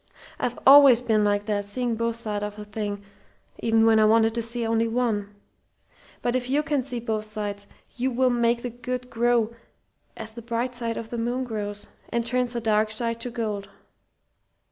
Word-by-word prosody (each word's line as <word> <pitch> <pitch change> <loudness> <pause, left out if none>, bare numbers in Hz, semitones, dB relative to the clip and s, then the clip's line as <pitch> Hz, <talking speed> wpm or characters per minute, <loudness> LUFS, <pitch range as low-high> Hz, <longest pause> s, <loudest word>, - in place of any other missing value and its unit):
I've 245 - -2
always 275 -3 +9
been 220 -3 +1
like 205 0 +1
that: 205 -1 -1
seeing 235 +3 -2
both 230 0 -1
sides 215 -3 -3
of 210 0 -5
a 210 - -7
thing 205 -1 -4 0.6
even 225 0 +3
when 225 -1 +5
I 215 - +5
wanted 225 +1 +4
to 235 - -1
see 230 +1 -3
only 225 0 +1
one. 225 -4 -1 0.9
But 240 +1 0
if 250 0 -1
you 290 +3 +2
can 290 -3 0
see 250 -1 -5
both 220 -2 -2
sides, 205 -1 -5 0.3
you 255 +2 0
will 255 0 +2
make 235 0 +1
the 245 - -3
good 250 +1 -5
grow, 235 -1 +2 0.6
as 220 - -7
the 235 +1 -9
bright 235 +2 -2
side 235 -2 -3
of 225 - -7
the 240 - -3
moon 240 +3 -1
grows, 205 -4 -5 0.2
and 235 0 -1
turns 250 0 0
the 240 - -1
dark 215 -1 +2
side 230 +1 -1
to 245 - -3
gold. 215 -4 -4
230 Hz, 190 wpm, -25 LUFS, 215-245 Hz, 0.9 s, always